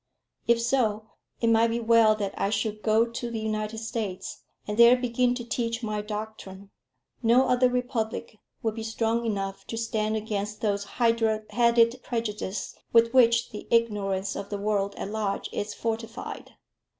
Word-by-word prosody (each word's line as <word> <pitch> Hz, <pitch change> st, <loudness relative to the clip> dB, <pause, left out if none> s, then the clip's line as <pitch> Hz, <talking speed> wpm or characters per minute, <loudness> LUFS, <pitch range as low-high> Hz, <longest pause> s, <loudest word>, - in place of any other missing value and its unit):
If 235 Hz, 0 st, +4 dB
so, 220 Hz, -3 st, 0 dB, 0.3 s
it 230 Hz, -, +2 dB
might 225 Hz, +1 st, +5 dB
be 230 Hz, +1 st, -1 dB
well 230 Hz, -1 st, +5 dB
that 200 Hz, -2 st, -3 dB
I 195 Hz, -, 0 dB
should 215 Hz, 0 st, -2 dB
go 220 Hz, +1 st, +3 dB
to 235 Hz, +1 st, -5 dB
the 230 Hz, -1 st, -4 dB
United 215 Hz, 0 st, -3 dB
States, 215 Hz, -4 st, -4 dB, 0.3 s
and 210 Hz, -, -2 dB
there 235 Hz, +2 st, +7 dB
begin 245 Hz, 0 st, +1 dB
to 240 Hz, -2 st, -5 dB
teach 230 Hz, 0 st, -2 dB
my 215 Hz, -1 st, -2 dB
doctrine. 210 Hz, -2 st, -7 dB, 0.5 s
No 245 Hz, +3 st, +4 dB
other 250 Hz, 0 st, +4 dB
republic 235 Hz, -3 st, -3 dB, 0.2 s
would 225 Hz, -1 st, 0 dB
be 225 Hz, -, -6 dB
strong 225 Hz, +1 st, -1 dB
enough 195 Hz, -2 st, -3 dB
to 225 Hz, -, -5 dB
stand 220 Hz, -1 st, -1 dB
against 210 Hz, -1 st, -3 dB
those 200 Hz, -2 st, 0 dB
hydra 230 Hz, -2 st, +2 dB
headed 235 Hz, +1 st, +3 dB
prejudices 215 Hz, -5 st, -3 dB, 0.2 s
with 230 Hz, 0 st, +4 dB
which 235 Hz, -2 st, +4 dB
the 210 Hz, -, -8 dB
ignorance 200 Hz, -4 st, +1 dB
of 200 Hz, -, -6 dB
the 205 Hz, -, -3 dB
world 200 Hz, -1 st, -1 dB
at 200 Hz, -, -5 dB
large 210 Hz, -2 st, -2 dB
is 205 Hz, +1 st, -3 dB
fortified. 225 Hz, 0 st, -5 dB
225 Hz, 160 wpm, -27 LUFS, 210-235 Hz, 0.5 s, there